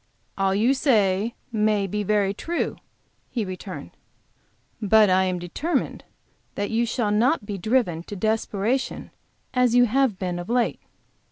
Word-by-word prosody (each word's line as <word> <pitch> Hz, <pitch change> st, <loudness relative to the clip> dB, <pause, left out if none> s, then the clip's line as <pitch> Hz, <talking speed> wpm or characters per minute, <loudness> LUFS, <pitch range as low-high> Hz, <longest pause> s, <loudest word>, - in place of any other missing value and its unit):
"All 195 Hz, 0 st, +1 dB
you 230 Hz, +6 st, +3 dB
say 215 Hz, -5 st, +2 dB, 0.2 s
may 210 Hz, -2 st, +2 dB
be 210 Hz, +2 st, -2 dB
very 205 Hz, -1 st, +1 dB
true," 335 Hz, +11 st, -3 dB, 0.5 s
he 230 Hz, -4 st, -2 dB
returned, 185 Hz, 0 st, -7 dB, 0.9 s
"but 210 Hz, -1 st, +5 dB
I 190 Hz, +1 st, +4 dB
am 185 Hz, -1 st, -1 dB
determined 270 Hz, -, -2 dB, 0.5 s
that 205 Hz, +1 st, -2 dB
you 230 Hz, +1 st, +1 dB
shall 220 Hz, -2 st, 0 dB
not 230 Hz, +4 st, +2 dB
be 205 Hz, -2 st, -5 dB
driven 215 Hz, -5 st, +1 dB
to 205 Hz, -, -7 dB
desperation 220 Hz, +4 st, -1 dB, 0.4 s
as 250 Hz, -2 st, +3 dB
you 245 Hz, 0 st, +6 dB
have 250 Hz, -3 st, +1 dB
been 180 Hz, -2 st, -3 dB
of 175 Hz, -, -7 dB
late." 240 Hz, 0 st, +1 dB
210 Hz, 145 wpm, -24 LUFS, 195-240 Hz, 0.9 s, you